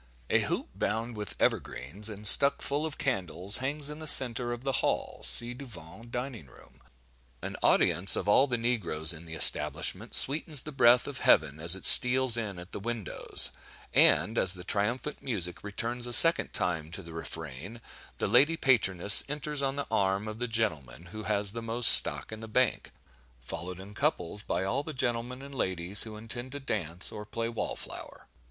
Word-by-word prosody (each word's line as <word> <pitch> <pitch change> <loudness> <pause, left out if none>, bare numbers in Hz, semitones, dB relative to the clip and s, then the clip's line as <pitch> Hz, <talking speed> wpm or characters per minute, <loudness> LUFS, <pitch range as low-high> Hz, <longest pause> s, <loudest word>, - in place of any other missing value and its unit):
A - - +2
hoop, - - -5
bound 115 +1 -5
with 105 -1 -7
evergreens, 90 - -5
and 105 0 -11
stuck 140 +6 +6
full 145 +3 -4
of 155 - -10
candles, 95 - -2
hangs 140 +3 -4
in 150 +1 -9
the 155 - -10
centre 120 -4 +3
of 120 +1 -8
the 135 - -3
hall - - -5
(ci 120 +1 0
devant 115 - -14
dining 125 - -8
room); 60 - -22 0.6
an - - -8
audience 90 +4 +3
of - - -6
all 130 +7 +2
the 120 -2 -4
negroes 95 -10 -2
in 85 0 -14
the 80 - -10
establishment 75 - +1
sweetens 145 0 +4
the 155 - -10
breath 125 -3 +2
of 140 -2 -8
heaven 75 +3 0
as 85 +3 +3
it 95 - -9
steals 130 -1 +7
in 105 -5 -6
at 90 +1 -13
the - - -9
windows; 115 -4 -2 0.4
and, 115 +2 +2
as 95 0 +4
the 90 - -12
triumphant 115 +10 -4
music 95 -9 -3
returns 120 +4 -3
a 120 - -4
second 165 +6 +8
time 80 -3 -4
to 80 - -8
the 85 0 -14
refrain, 80 - -10 0.4
the - - -4
lady 135 +10 +1
Patroness 100 - +5
enters 150 0 -3
on 135 0 -3
the 140 - -6
arm 95 +1 -2
of 110 +1 -9
the 125 - -5
gentleman 85 - -5
who 110 0 -9
has 100 -2 0
the 115 +2 -9
most 115 +1 +3
stock - - +2
in 110 - -10
the 110 - -11
Bank, 125 +3 -2 0.5
followed 85 +8 -9
in 100 +2 -13
couples 105 - -4
by 90 -3 -5
all 120 +9 -4
the 155 0 -10
gentlemen 125 +1 -5
and 140 0 -13
ladies 95 -4 -1
who 110 -1 -11
intend 120 +4 -9
to 145 - -8
dance 90 - -3
or 105 -1 -10
play 115 +2 -7
wall 115 - -6
flower. - - -10
115 Hz, 185 wpm, -26 LUFS, 95-130 Hz, 0.6 s, second